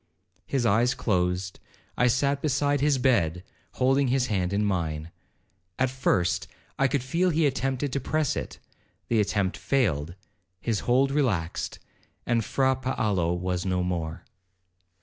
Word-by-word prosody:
His 130 -3 0
eyes 115 +4 +3
closed,—I 90 +4 -2
sat 140 +3 +1
beside 145 -1 +1
his 145 -1 +3
bed, 90 -10 +1 0.3
holding 135 +2 +2
his 125 0 +2
hand 90 -2 0
in 105 +1 +1
mine. 80 -4 -2 0.7
At 130 -1 +1
first, 100 -9 +1 0.3
I 135 - +4
could 135 -1 -1
feel 170 +8 +1
he 160 -1 +2
attempted 135 0 -1
to 140 - 0
press 155 +1 0
it—the 115 - -5
attempt 100 -2 0
failed, 85 - 0 0.4
his 110 -1 -1
hold 135 +3 +4
relaxed. 110 - -1 0.6
Fra 130 +4 +1
Paolo 105 -10 0
was 90 0 -2
no 90 -1 0
more. 85 -3 -3
120 Hz, 130 wpm, -26 LUFS, 90-135 Hz, 0.7 s, I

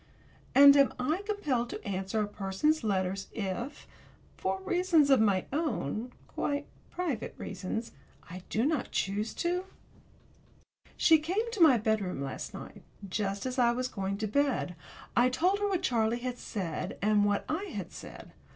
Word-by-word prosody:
And 280 +1 +10
am 280 -1 +5
I 305 +9 0
compelled 285 - -1
to - - -7
answer 195 +2 -1
a - - -2
person's 205 +11 0
letters 195 -2 -1
if, 225 +6 -4 0.5
for 190 0 -2
reasons 335 - +3
of 265 - +6
my 200 -4 +2
own 250 - -2 0.2
quite 285 0 -2 0.2
private 315 -11 -3
reasons 200 +4 -4 0.4
I 180 +2 -8
do 225 +3 +1
not 305 -1 0
choose 205 +3 -1
to? 355 +2 -1 1.3
She 320 -2 +6
came 390 +10 -1
to 430 -5 -3
my 290 -7 +8
bedroom 215 -7 0
last 135 -1 -5
night, - - -9 0.3
just 195 +1 -2
as 255 0 -2
I 240 -1 +4
was 255 +1 -1
going 195 -3 -3
to 215 +1 -2
bed. 265 -7 0 0.4
I 245 +1 +5
told 360 +10 +1
her 410 - +1
what 375 -2 -1
Charlie 230 -6 +1
had 250 0 -4
said, 180 -7 -4
and 210 +1 +3
what 205 0 +1
I 345 +6 -2
had - - -6
said. - - -10
240 Hz, 160 wpm, -30 LUFS, 200-305 Hz, 1.3 s, And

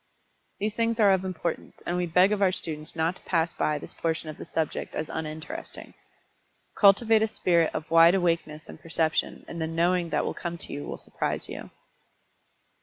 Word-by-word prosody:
These 210 +1 -1
things 230 0 0
are 205 -2 +6
of 190 -1 +2
importance, 180 -3 -4
and 175 - -1
we 180 0 0
beg 180 +4 +4
of 210 -1 0
our 190 -2 +5
students 155 -4 -4
not 165 +2 0
to - - -19
pass 165 -1 0
by 150 - 0
this - - -8
portion 160 -1 -2
of 155 - -8
the - - -7
subject 160 -2 -3
as 155 - -3
uninteresting. 155 0 -6 0.8
Cultivate 220 +2 +5
a 220 - +3
spirit 170 -6 +2
of 155 - -5
wide 165 +2 +7
awakeness 165 -4 -1
and - - -11
perception, 160 0 -1
and 170 - -6
the 160 - 0
"knowing" 170 +1 +1
that - - 0
will - - -2
come 170 0 -5
to - - -8
you 145 - -5
will - - -5
surprise - - -3
you. - - -8
170 Hz, 190 wpm, -27 LUFS, 160-185 Hz, 0.8 s, wide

